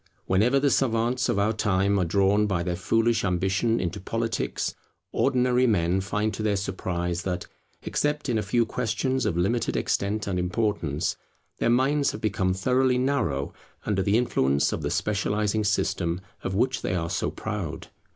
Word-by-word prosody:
Whenever 115 +9 +3
the 140 0 +2
savants 120 +1 +1
of - - +1
our 105 +2 +2
time 100 -2 +1
are - - +2
drawn 100 +4 +3
by 90 -4 0
their 90 0 -1
foolish 115 +6 +1
ambition 95 +5 +1
into 90 +2 -3
politics, 115 +4 -2 0.4
ordinary 125 -1 +2
men 95 -3 +2
find 105 +3 -1
to - - -5
their 105 -1 +1
surprise 90 -3 -2
that, 90 -1 -3 0.4
except 150 0 -1
in 115 -4 +1
a - - 0
few 115 +4 +1
questions 130 +3 -1
of 85 - -1
limited 100 +7 0
extent 100 +1 -1
and 95 -2 -1
importance, 90 -5 -1 0.4
their - - +2
minds 135 +4 +2
have 105 - -6
become 95 -3 0
thoroughly 125 +7 +2
narrow 125 - 0 0.3
under 100 -2 +1
the 100 +3 +2
influence 70 - +2
of - - -3
the - - -2
specializing 105 +1 0
system 90 -4 0 0.2
of 95 - -2
which 130 +4 +1
they 90 - -1
are 85 -2 -1
so 95 - 0
proud. - - -5
105 Hz, 165 wpm, -26 LUFS, 95-120 Hz, 0.4 s, Whenever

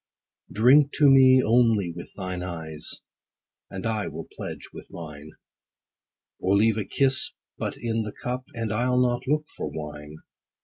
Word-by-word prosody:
Drink 135 +7 +5
to 145 -2 +5
me, 130 -1 +7
only 115 -5 +3
with 85 - -9
thine 90 -2 -4
eyes, 80 -4 -6 0.7
And 95 +1 -6
I 110 -2 -1
will - - -7
pledge - - -7
with - - -11
mine; 75 -2 -10 1.1
Or 95 +2 +2
leave 110 +1 +3
a 105 - -3
kiss 130 +5 +2 0.3
but - - -3
in 115 -1 -1
the 105 -1 -4
cup, 125 +4 -5
And 115 -2 -2
I'll 125 +3 +1
not 125 0 0
look 150 +2 +1
for - - -4
wine. 75 0 -8
110 Hz, 150 wpm, -25 LUFS, 90-125 Hz, 1.1 s, me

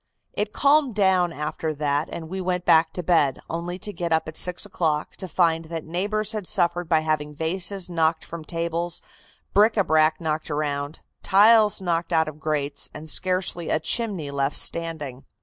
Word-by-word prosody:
It 210 0 -2
calmed 280 -3 +3
down 190 -4 +3
after 155 0 -4
that 145 +1 -1
and 160 - -6
we 190 +3 -4
went 180 -1 -2
back 160 0 +5
to 180 - -4
bed, 155 -7 +3
only 170 +2 -4
to 205 +2 -5
get 170 -3 -3
up 160 -1 +2
at 155 - -7
six 180 +3 +1
o'clock 160 -6 -1
to 190 - -6
find 165 -2 +1
that 165 -1 -6
neighbors 205 +5 -1
had 210 -5 -4
suffered 175 -1 +1
by 160 -2 +4
having 150 -1 -2
vases 180 +4 -1
knocked 165 -2 0
from 170 -1 -8
tables, 170 +1 -3 0.5
bric 215 +3 +4
a 200 - +4
brac 155 -1 +3
knocked 155 -2 -3
around, 145 0 -3 0.2
tiles 210 +1 +5
knocked 170 -2 -1
out 160 -1 +3
of 155 0 -8
grates 145 -2 -2
and 155 +1 -4
scarcely 180 -2 -1
a - - +2
chimney 175 -3 -1
left 140 0 -1
standing. 155 -6 -1
165 Hz, 180 wpm, -24 LUFS, 155-185 Hz, 0.5 s, back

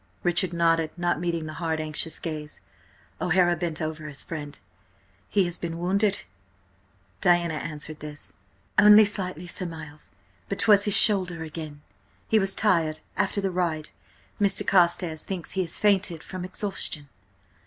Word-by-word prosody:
Richard 175 +1 +1
nodded, 165 -2 +2
not 175 -2 0
meeting 170 -2 -2
the 155 - -6
hard, 160 -1 -1
anxious 155 +1 0
gaze. 155 -2 -6 0.6
O'Hara 175 0 +3
bent 165 -1 -3
over 155 -1 -5
his 140 -2 -6
friend. 150 -3 -7 0.7
"He 200 - +3
has 175 0 -4
been 165 -1 -4
wounded?" 195 +3 0 1.0
Diana 175 -3 +3
answered 155 0 -6
this. 150 -1 -9 0.5
"Only 210 +1 +8
slightly, 185 -4 -1
Sir 180 +1 -3
Miles, 155 -2 -10 0.4
but 200 - -2
'twas 205 0 +5
his 205 - +4
shoulder 180 -6 +3
again. 155 -2 -8 0.4
He 220 - +3
was 195 -1 +1
tired 165 -7 +1
after 200 - 0
the 195 -1 -1
ride–Mr. 175 +3 -2
Carstares 175 -3 +2
thinks 185 -4 -5
he 190 - -1
has 175 - -2
fainted 195 -5 +1
from 185 -1 -7
exhaustion." 185 -6 -3
170 Hz, 145 wpm, -26 LUFS, 155-190 Hz, 1.0 s, Only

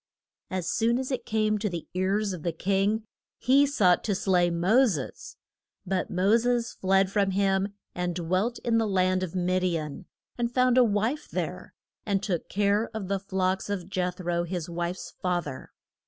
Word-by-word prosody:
As 185 -3 -3
soon 230 +5 +2
as 260 +1 -3
it 260 - -3
came 215 -1 +1
to 210 0 -1
the 170 -3 -6
ears 195 +2 0
of 175 - -6
the 170 - -1
king, 195 +6 0 0.3
he 275 +3 +4
sought 190 -11 +3
to 205 - +1
slay 180 -2 +2
Mo 190 +10 +4
ses. 150 - -5 0.5
But 185 0 -1
Mo 190 +4 +3
ses 240 0 0
fled 190 0 +2
from 200 -1 +2
him, 195 +1 +1 0.2
and 180 -1 -2
dwelt 185 +7 0
in 230 -1 +3
the 225 - +1
land 185 -1 +2
of 185 -1 -4
Mid 185 0 +1
i 175 -2 +1
an, 155 +4 -7 0.3
and 235 0 0
found 255 0 +4
a - - +7
wife 225 +7 0
there, - - -4 0.3
and 200 -2 0
took 175 -5 -2
care 205 +2 +1
of 200 -4 -4
the 200 -1 0
flocks 190 0 -1
of 190 -3 -3
Jeth 180 -2 -2
ro, 175 -1 -1
his 175 -1 -4
wife's 175 +1 -4
fath 180 -2 0
er. 135 -3 -8
190 Hz, 185 wpm, -27 LUFS, 180-215 Hz, 0.5 s, a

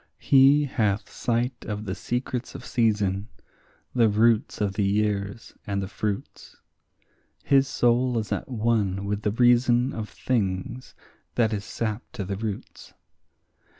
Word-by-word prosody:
He 140 +2 +5
hath 110 -7 -1
sight 120 +2 -1
of 105 0 -4
the 95 - -3
secrets 125 +3 -3
of - - -8
season, 105 -4 +1 0.7
the 115 -3 +4
roots 110 +2 +2
of 100 -2 0
the 105 - -1
years 100 +1 -1
and 100 -1 -1
the 95 - -3
fruits; 105 0 -5 0.9
His 135 -1 +4
soul 120 -1 +2
is 110 -2 -3
at - - -2
one 105 -5 0
with 105 +1 -2
the 105 - 0
reason 120 +2 +3
of 110 -1 -5
things 105 0 -2 0.4
that 110 -2 +2
is 100 -1 -3
sap 110 0 -3
to 100 - -4
the 100 +1 -3
roots. 105 0 -6
110 Hz, 140 wpm, -25 LUFS, 100-120 Hz, 0.9 s, He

